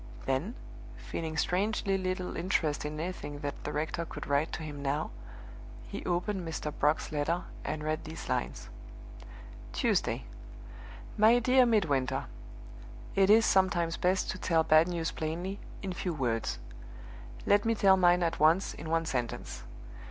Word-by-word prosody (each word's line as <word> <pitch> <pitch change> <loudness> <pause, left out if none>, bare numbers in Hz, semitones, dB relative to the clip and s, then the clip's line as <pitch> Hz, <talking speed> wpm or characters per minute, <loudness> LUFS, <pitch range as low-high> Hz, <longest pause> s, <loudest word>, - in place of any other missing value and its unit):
Then 140 - -1 0.4
feeling 160 -1 -5
strangely 195 +4 +1
little 185 -1 -2
interest 160 -5 0
in 150 +1 -4
anything 155 -4 -5
that 145 -1 -5
the 150 - -3
rector 155 +3 -2
could 165 - -7
write 145 +3 +1
to 160 - -4
him 145 -2 -6
now 145 +2 -1 0.8
he - - -6
opened 180 +3 -1
Mr. 160 -3 -4
Brock's 150 +2 +1
letter, 155 +4 0 0.2
and 155 0 -3
read 155 0 -1
these 160 0 -8
lines: 60 - -2 1.0
"Tuesday. - - +1 0.9
"MY 220 +3 +7
DEAR 250 +1 +5
MIDWINTER 150 - +1 0.9
It 195 0 +4
is 225 +2 +7
sometimes 175 -3 +2
best 185 +1 +1
to 185 - -7
tell 165 -2 +2
bad 155 +1 +5
news 170 -2 -2
plainly, 175 +5 -4 0.2
in 190 -2 -3
few 175 -1 -3
words. 120 -5 -1 0.9
Let 205 0 +4
me 230 0 +2
tell 195 -2 +6
mine 180 -1 +4
at 165 - -1
once, 160 +5 +4
in 160 - -7
one 165 0 +1
sentence. 125 -6 -3
165 Hz, 145 wpm, -30 LUFS, 150-190 Hz, 1.0 s, MY